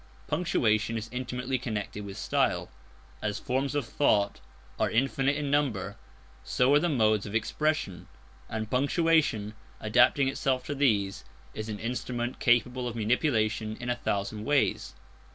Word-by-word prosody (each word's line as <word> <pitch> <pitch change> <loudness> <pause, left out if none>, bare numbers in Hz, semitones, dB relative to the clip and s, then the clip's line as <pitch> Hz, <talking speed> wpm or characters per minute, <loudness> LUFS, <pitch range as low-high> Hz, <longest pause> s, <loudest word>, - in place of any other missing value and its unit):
Punctuation 115 -9 +1
is 115 0 -5
intimately 125 +1 -3
connected 105 -4 -4
with 100 -1 -8
style. - - 0 0.5
As 105 0 -2
forms 135 +4 -1
of 145 -4 0
thought 105 -5 +1 0.4
are - - +2
infinite 135 +4 +1
in 145 -1 -2
number, 110 -9 0 0.5
so 125 - +2
are 145 - +6
the 175 +3 +1
modes 110 -7 +2
of 100 - -6
expression; 115 - -1 0.4
and 110 -1 -4
punctuation, 140 - +2 0.3
adapting 120 +5 +4
itself 135 -1 0
to 145 - -3
these, 105 -9 +1 0.3
is 110 +1 -5
an 105 - -3
instrument 120 +1 -3
capable 125 0 +2
of 120 - -5
manipulation 110 -2 0
in 120 0 -2
a - - +1
thousand 105 -2 -2
ways. 145 +3 +1
120 Hz, 140 wpm, -28 LUFS, 110-135 Hz, 0.5 s, are